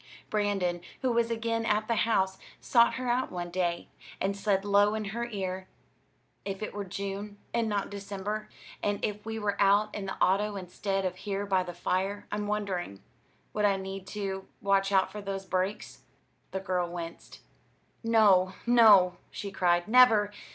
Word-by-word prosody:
Brandon, 195 -5 0 0.2
who 255 - +2
was 235 0 +2
again 230 0 -1
at 215 -1 +1
the 235 - +1
house, 190 -4 +1 0.2
sought 235 -1 +4
her 255 -1 -4
out 245 +2 0
one 175 -1 -5
day, 175 -1 -1 0.3
and 195 +1 0
said 200 -1 0
low 205 +1 +4
in 215 -1 -3
her 235 +1 -2
ear: 190 -4 -4 0.8
"If 195 +1 -4
it - - -5
were 205 -1 -4
June 200 +2 -5 0.2
and 230 -2 +1
not 205 -1 -2
December, 205 +1 -5 0.3
and 205 0 0
if 210 -1 -4
we 225 0 -3
were 205 -2 -1
out 205 +2 +4
in 195 -2 -4
the 190 - -4
auto 205 +3 +2
instead 195 +1 -2
of 185 0 -2
here 200 +1 -3
by 190 -2 +2
the 175 -1 -6
fire, 190 +3 -1
I'm 210 0 -2
wondering; 190 - -3 0.5
would 210 0 +1
I 200 -1 +3
need 190 0 -6
to 195 -2 -3
watch 195 0 +2
out 190 -1 +3
for 210 +1 -6
those 195 -1 -4
brakes?" 190 +2 -2 0.5
The 190 - -3
girl 180 -2 -1
winced. 170 -1 -8 0.6
"No, 205 -5 +4
no," 210 -7 +6
she 200 -1 -6
cried; 175 -1 +2
"never! 220 -3 +6
200 Hz, 170 wpm, -29 LUFS, 190-210 Hz, 0.8 s, no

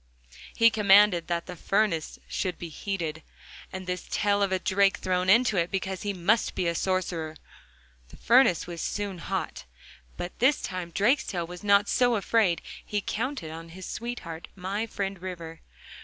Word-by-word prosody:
He 230 0 +6
commanded 205 -4 +5
that 170 -1 -1
the 180 - -7
furnace 195 -4 0
should 185 -2 -2
be 170 - -7
heated, 160 -3 -4 0.5
and 190 0 -6
this 180 0 -4
tail 205 -1 +1
of 200 -1 +2
a 190 - +2
drake 195 +1 +2
thrown 185 0 0
into 220 0 +5
it, 170 0 +1
because 190 -1 -3
he 205 - -1
must 200 +4 +1
be 185 - -1
a 170 - +1
sorcerer. 170 -3 -1 0.7
The - - -14
furnace 235 -8 +4
was 170 -1 -6
soon 200 -3 -3
hot, 115 - -4 0.5
but 175 - -6
this 265 +3 +4
time 185 -2 -4
Drakestail 205 - +1
was 180 +2 -10
not 200 0 +4
so 245 -1 +3
afraid; 205 -4 +2 0.2
he 210 - -2
counted 225 - -3
on 165 +1 -8
his 185 +2 -9
sweetheart, 195 -9 -6
my 195 +4 -3
friend 195 -3 -4
River. 170 -3 -7
190 Hz, 165 wpm, -27 LUFS, 175-205 Hz, 0.7 s, He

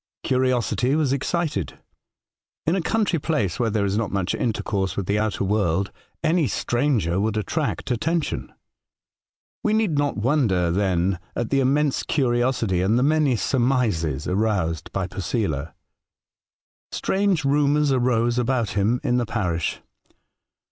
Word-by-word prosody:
Curiosity 130 0 +1
was 150 -4 +1
excited. 140 - -2 0.9
In 165 - +2
a 190 - 0
country 195 -2 +1
place, 110 - -1
where 115 - +2
there 105 -1 0
is 100 +2 0
not 115 - -1
much 95 -2 -1
intercourse 100 -4 -1
with 100 - -1
the 100 +3 +1
outer 110 -2 -1
world, 95 -2 0 0.3
any 160 -2 +2
stranger 120 - 0
would 110 +1 0
attract 105 +3 -2
attention. 160 +7 -1 1.1
We 215 - +2
need 210 -9 +1
not 145 -4 0
wonder, 105 - +2
then, 95 -1 +1 0.2
at 120 - -2
the 135 - +3
intense 140 +2 +2
curiosity, 120 - +1
and 105 +5 +2
the 125 - +3
many 150 -3 +3
surmises, 110 - 0
aroused 90 -5 -1
by 95 - -1
Posela. 90 - -3 1.2
Strange 190 -6 0
rumours 145 +1 +3
arose 120 -2 +2
about 125 -2 0
him 105 +5 +1
in 125 -3 +1
the 120 -2 0
parish. 90 -7 -2
120 Hz, 135 wpm, -23 LUFS, 95-140 Hz, 1.2 s, the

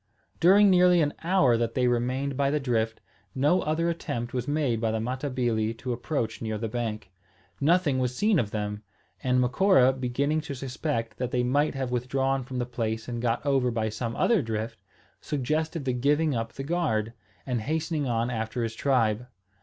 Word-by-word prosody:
During 195 +3 +6
nearly 180 -1 +5
an 145 - -1
hour 165 -9 +4
that 115 0 -2
they 125 -1 +2
remained 130 +3 0
by 140 0 +1
the 150 +1 +1
drift, 115 -4 -1 0.4
no 145 +7 +3
other 160 +2 0
attempt 120 -8 -3
was 125 +1 -2
made 145 -6 0
by 115 - +1
the 110 0 -1
Matabili 120 -3 -1
to 125 +1 -3
approach 120 -2 -3
near 110 -1 -2
the 115 +1 -3
bank. 110 -4 -4 0.5
Nothing 155 -3 +3
was 125 -1 -1
seen 205 +2 +3
of 110 - -1
them; 105 -1 -3 0.4
and 125 0 +2
Macora, 130 +1 +4
beginning 135 +4 -1
to 150 -2 -6
suspect 125 -4 -3
that 125 -1 -2
they 125 0 0
might 145 +4 +1
have 130 -2 -3
withdrawn 135 +2 0
from 130 0 -6
the 120 - 0
place 115 -2 -3
and 120 -1 -4
got 120 +3 -1
over 135 -3 +2
by 110 -2 -1
some 115 +2 -4
other 230 -6 +3
drift, 115 -2 -4 0.4
suggested 155 +2 -2
the 130 - 0
giving 145 +5 +2
up 115 -1 -3
the 135 - -6
guard, 135 -9 -1 0.3
and 125 -4 -1
hastening 155 +2 -1
on 120 0 0
after 110 +1 -2
his 115 -1 -2
tribe. 120 -2 +1
125 Hz, 185 wpm, -27 LUFS, 115-145 Hz, 0.5 s, During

